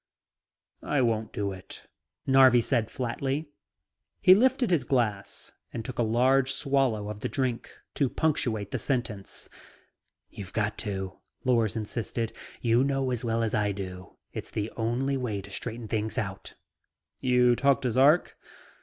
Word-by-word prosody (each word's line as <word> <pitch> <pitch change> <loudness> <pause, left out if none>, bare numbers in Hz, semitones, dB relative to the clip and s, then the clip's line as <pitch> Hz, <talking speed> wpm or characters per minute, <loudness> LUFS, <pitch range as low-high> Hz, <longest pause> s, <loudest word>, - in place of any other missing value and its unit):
"I 145 -2 +1
won't 110 -2 0
do 100 -1 -2
it," 95 -1 -9 0.4
Narvi 130 -2 +6
said 115 -2 0
flatly. 135 +4 -2 0.7
He 185 - +8
lifted 250 +2 +3
his 160 -7 +3
glass 110 -7 -1 0.2
and 115 - -5
took 130 - -6
a - - +4
large 130 +4 +3
swallow 135 -7 +1
of 105 0 -6
the - - -3
drink 130 -4 -2 0.2
to 140 -3 +1
punctuate 115 -11 0
the - - -2
sentence. 120 -7 -3 0.8
"You've 95 -3 -9
got 105 -1 -1
to," 95 -3 -4 0.2
Lors 115 -5 +2
insisted. 115 +1 -3 0.3
"You 120 +1 +3
know 135 -1 0
as 125 0 -2
well 115 -1 0
as 110 - -1
I 105 -1 +1
do, 95 -2 -8 0.2
it's - - -6
the 105 +1 -3
only 125 +4 0
way 115 -6 -2
to 100 +1 -10
straighten 115 +4 -5
things 110 0 -2
out." 95 -2 -4 0.6
"You 125 -1 +4
talk 140 +1 +2
to 125 - +1
Zark?" 140 +8 +4
120 Hz, 150 wpm, -28 LUFS, 105-135 Hz, 0.8 s, He